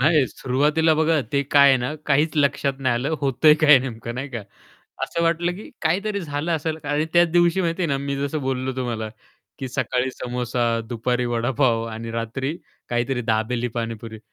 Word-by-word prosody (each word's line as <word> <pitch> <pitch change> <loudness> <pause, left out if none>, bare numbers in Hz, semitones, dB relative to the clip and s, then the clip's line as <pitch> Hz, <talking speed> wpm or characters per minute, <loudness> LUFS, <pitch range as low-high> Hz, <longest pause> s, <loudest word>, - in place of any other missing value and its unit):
नाही, 150 0 +4
सुरुवातीला 150 +6 +1
बघा 160 0 +2
ते 140 - +2
काय 140 0 +5
आहे 135 - +6
ना, 125 +5 -3
काहीच 150 +2 +3
लक्षात 140 -1 +2
नाही. 130 -3 +1
आलं 135 +7 -1
होतंय 140 +2 +5
काय 150 -3 +8
नेमकं 120 -2 -6
नाही 135 +3 -4
का. 120 - -4 0.6
असं 170 - -1
वाटलं, 170 +1 +1
की 210 - -10
काहीतरी 200 +5 0
झालं 150 0 -3
असेल 155 +1 -3
आणि 145 +1 0
त्याच 175 0 +5
दिवशी 175 +1 +3
माहिती 170 0 -1
आहे - - +2
ना 140 - +1
मी 140 0 -3
जसं 140 +2 -2
बोललो 130 -1 -2
तुम्हाला, 120 -4 -3 0.5
की 135 - -4
सकाळी 130 0 -1
समोसा, 125 -1 -3 0.3
दुपारी 125 +1 -1
वडापाव 120 0 +1
आणि 115 +1 -6
रात्री 115 +6 -3 0.3
काहीतरी 120 +1 -1
दाबेली, 115 +2 0
पाणीपुरी. 115 -1 -5
135 Hz, 175 wpm, -23 LUFS, 120-155 Hz, 0.6 s, काय